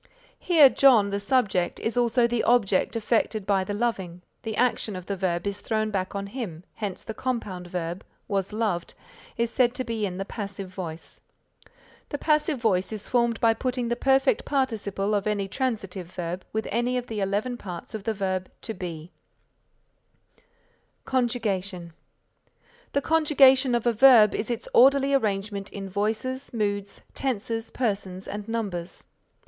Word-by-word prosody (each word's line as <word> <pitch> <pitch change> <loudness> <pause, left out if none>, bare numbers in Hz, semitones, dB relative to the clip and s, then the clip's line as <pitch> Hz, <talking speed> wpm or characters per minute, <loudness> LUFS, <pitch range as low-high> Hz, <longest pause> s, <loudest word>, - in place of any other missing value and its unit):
Here 325 -6 +7
John 245 -7 +5
the 200 - -1
subject 200 -5 +1
is 225 - -2
also 240 0 +3
the 235 -1 0
object 225 -3 +2
affected 220 -2 0
by 195 -1 +2
the 205 +2 -4
loving, 190 -6 -2 0.2
the 220 -1 -4
action 235 -4 +1
of 185 -1 -7
the 200 - -2
verb 180 -2 -1
is 200 0 -3
thrown 215 -1 -1
back 190 -1 -2
on 200 0 -2
him, 200 -7 -6
hence 205 -4 -5
the 220 - -6
compound 215 -8 -3
verb 175 0 -4 0.2
was 195 -2 -1
loved 210 -6 -2 0.4
is 235 0 0
said 245 -1 +2
to 255 - -2
be 225 -4 -2
in 180 -1 -6
the 195 - -3
passive 200 -3 -6
voice. 175 -3 -7 0.9
The 290 - -3
passive 305 -1 +1
voice 195 -5 +1
is 215 -2 -5
formed 235 -2 +1
by 230 -1 +4
putting 250 0 -2
the 240 - +1
perfect 270 - +2
participle 215 -7 -1
of 205 0 0
any 205 -2 0
transitive 195 -7 -3
verb 175 +1 -5
with 220 0 -2
any 240 +3 0
of 245 - -3
the 220 -3 -5
eleven 205 +5 -1
parts 185 -3 -7
of 215 -2 -5
the 220 +1 -1
verb 185 -2 -2
To 225 - -4
Be. 175 -3 -7 1.9
CONJUGATION 200 -9 -1 1.0
The 280 - +2
conjugation 275 -5 +5
of 235 - -1
a 240 - +3
verb 230 -3 +7
is 210 - -2
its 235 -2 -3
orderly 275 +2 +5
arrangement 200 -5 -1
in 195 -1 -6
voices, 220 +7 -2
moods, 205 -3 -2
tenses, 225 -3 -2
persons 195 -6 -3
and 205 +1 -6
numbers. 195 -7 -3
215 Hz, 160 wpm, -26 LUFS, 195-245 Hz, 1.9 s, Here